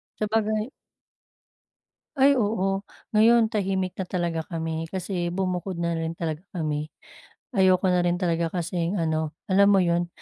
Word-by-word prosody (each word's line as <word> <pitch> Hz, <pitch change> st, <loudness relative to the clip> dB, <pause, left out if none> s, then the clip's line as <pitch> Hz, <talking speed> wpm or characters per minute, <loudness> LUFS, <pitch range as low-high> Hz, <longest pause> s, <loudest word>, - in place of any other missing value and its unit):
Sabagay 215 Hz, +2 st, 0 dB, 1.5 s
Ay 275 Hz, 0 st, +5 dB
oo, 200 Hz, -3 st, 0 dB, 0.2 s
ngayon 225 Hz, +1 st, +5 dB
tahimik 190 Hz, -3 st, -1 dB
na 190 Hz, -, -2 dB
talaga 170 Hz, -3 st, -2 dB
kami 165 Hz, -2 st, -3 dB
kasi 180 Hz, -1 st, -3 dB
bumukod 185 Hz, 0 st, -2 dB
na 170 Hz, -1 st, 0 dB
rin 165 Hz, 0 st, -3 dB
talaga 165 Hz, +2 st, -4 dB
kami. 150 Hz, -3 st, -2 dB, 0.7 s
Ayoko 190 Hz, 0 st, +4 dB
na 180 Hz, -1 st, +3 dB
rin 175 Hz, -, +2 dB
talaga 170 Hz, -2 st, 0 dB
kasing 175 Hz, +1 st, -1 dB
ano 160 Hz, -1 st, -1 dB, 0.2 s
alam 200 Hz, +2 st, +5 dB
mo 195 Hz, -, +5 dB
yun, 170 Hz, 0 st, +1 dB
180 Hz, 135 wpm, -25 LUFS, 165-200 Hz, 1.5 s, Ay